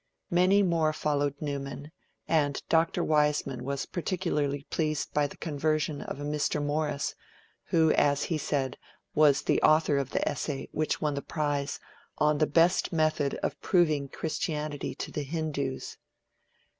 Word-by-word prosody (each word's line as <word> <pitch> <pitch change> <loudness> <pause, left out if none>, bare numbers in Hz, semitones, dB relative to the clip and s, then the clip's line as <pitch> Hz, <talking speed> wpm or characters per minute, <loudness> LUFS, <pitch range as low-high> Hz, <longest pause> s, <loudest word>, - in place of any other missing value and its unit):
Many 185 +3 +4
more 165 -4 +2
followed 145 -2 0
Newman, 140 0 -5 0.4
and 145 -3 +2
Dr. 165 0 +2
Wiseman 150 -4 +1
was 140 +1 -2
particularly 155 -6 -1
pleased 155 -3 -1
by 150 -1 +2
the - - -13
conversion 155 -1 -1
of - - -6
a - - -5
Mr. 150 +1 0
Morris, 145 0 -1 0.5
who, 160 -2 +3
as 145 0 +3
he 160 -3 -1
said, 135 -3 -2 0.3
was 150 -2 +4
'the - - +2
author 155 -2 +4
of 135 -2 -3
the - - -1
essay, 140 0 -3
which 155 0 -1
won 150 -1 +1
the 140 - -3
prize 145 -2 -2 0.4
on 150 -1 +2
the 155 - +3
best 170 +4 +3
method 155 -4 +1
of 145 - -2
proving 155 -6 +2
Christianity 150 -2 -3
to - - -6
the 150 - -3
Hindus'. 145 -3 -3
150 Hz, 145 wpm, -29 LUFS, 140-155 Hz, 0.5 s, Many